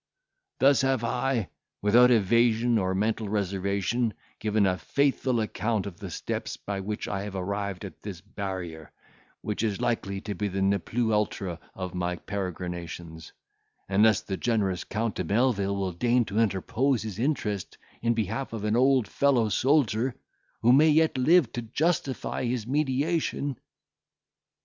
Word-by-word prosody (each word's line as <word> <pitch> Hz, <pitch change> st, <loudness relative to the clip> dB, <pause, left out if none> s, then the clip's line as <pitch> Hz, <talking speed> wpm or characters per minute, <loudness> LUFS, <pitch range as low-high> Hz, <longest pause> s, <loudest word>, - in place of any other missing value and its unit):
"Thus 140 Hz, +1 st, +5 dB
have 135 Hz, -3 st, +1 dB
I, 120 Hz, -2 st, 0 dB, 0.3 s
without 120 Hz, +4 st, +6 dB
evasion 115 Hz, +1 st, +3 dB
or 95 Hz, -1 st, 0 dB
mental 110 Hz, +1 st, 0 dB
reservation, 100 Hz, +3 st, -1 dB, 0.2 s
given 105 Hz, -1 st, +2 dB
a 90 Hz, -1 st, +1 dB
faithful 130 Hz, -, +1 dB
account 110 Hz, 0 st, -1 dB
of 95 Hz, -4 st, -8 dB
the 100 Hz, -3 st, -6 dB
steps 85 Hz, -, -4 dB
by 100 Hz, -1 st, -4 dB
which 105 Hz, +2 st, -4 dB
I 100 Hz, -1 st, -2 dB
have 100 Hz, -1 st, -6 dB
arrived 100 Hz, 0 st, -3 dB
at 95 Hz, -, -10 dB
this 100 Hz, -5 st, -7 dB
barrier, 95 Hz, -5 st, -6 dB, 0.5 s
which 105 Hz, -, -3 dB
is 105 Hz, -4 st, -1 dB
likely 115 Hz, -5 st, -1 dB
to 105 Hz, -, -4 dB
be 100 Hz, +2 st, -2 dB
the 95 Hz, 0 st, -1 dB
ne 100 Hz, +1 st, +3 dB
plus 115 Hz, +4 st, -1 dB
ultra 100 Hz, -5 st, -1 dB, 0.2 s
of 90 Hz, -2 st, -5 dB
my 90 Hz, 0 st, -1 dB
peregrinations, 85 Hz, -4 st, -6 dB, 0.6 s
unless 105 Hz, +2 st, +4 dB
the 95 Hz, -, -4 dB
generous 100 Hz, -6 st, 0 dB
Count 110 Hz, 0 st, -2 dB
de -, -, -3 dB
Melvil 100 Hz, -3 st, +1 dB
will 95 Hz, -2 st, -1 dB
deign 120 Hz, +7 st, +2 dB
to 100 Hz, +1 st, -2 dB
interpose 115 Hz, +4 st, +1 dB
his 110 Hz, -2 st, -6 dB
interest 115 Hz, -8 st, -1 dB, 0.2 s
in 115 Hz, 0 st, +1 dB
behalf 115 Hz, +4 st, -2 dB
of 110 Hz, -2 st, -4 dB
an 105 Hz, +1 st, +1 dB
old 130 Hz, -2 st, +4 dB
fellow 125 Hz, -5 st, +2 dB
soldier, 130 Hz, -1 st, +2 dB, 0.5 s
who 120 Hz, +2 st, +6 dB
may 155 Hz, +4 st, +6 dB
yet 160 Hz, 0 st, +3 dB
live 145 Hz, +1 st, +4 dB
to 120 Hz, -, -3 dB
justify 140 Hz, +3 st, -1 dB
his 120 Hz, -2 st, -1 dB
mediation." 145 Hz, +1 st, 0 dB
110 Hz, 150 wpm, -27 LUFS, 95-125 Hz, 0.6 s, without